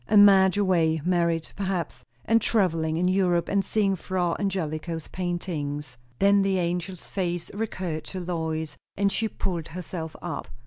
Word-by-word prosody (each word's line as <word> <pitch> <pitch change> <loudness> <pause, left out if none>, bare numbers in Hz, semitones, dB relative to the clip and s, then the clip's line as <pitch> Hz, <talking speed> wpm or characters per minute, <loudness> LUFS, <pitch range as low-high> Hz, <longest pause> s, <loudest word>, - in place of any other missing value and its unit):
And 205 -1 +8
Madge 190 -1 +6
away; 170 -5 +3
married, 170 -2 +1
perhaps, 185 -10 -3 0.2
and 225 0 +4
travelling 165 -8 +1
in 180 +2 +2
Europe, 180 -2 +2
and 200 -1 +2
seeing 200 -2 +1
Fra 175 -1 -1
Angelico's 165 -4 -2
paintings. 150 -6 -3 0.2
Then 200 0 +5
the 195 -1 +2
angel's 175 +1 -3
face 175 -3 -2
recurred 185 -7 -3
to 190 - -5
Lois, 160 -3 -3 0.2
and 200 0 +2
she 220 +3 0
pulled 175 -6 -3
herself 165 -2 -6
up. 175 -2 -5
180 Hz, 145 wpm, -26 LUFS, 165-195 Hz, 0.2 s, And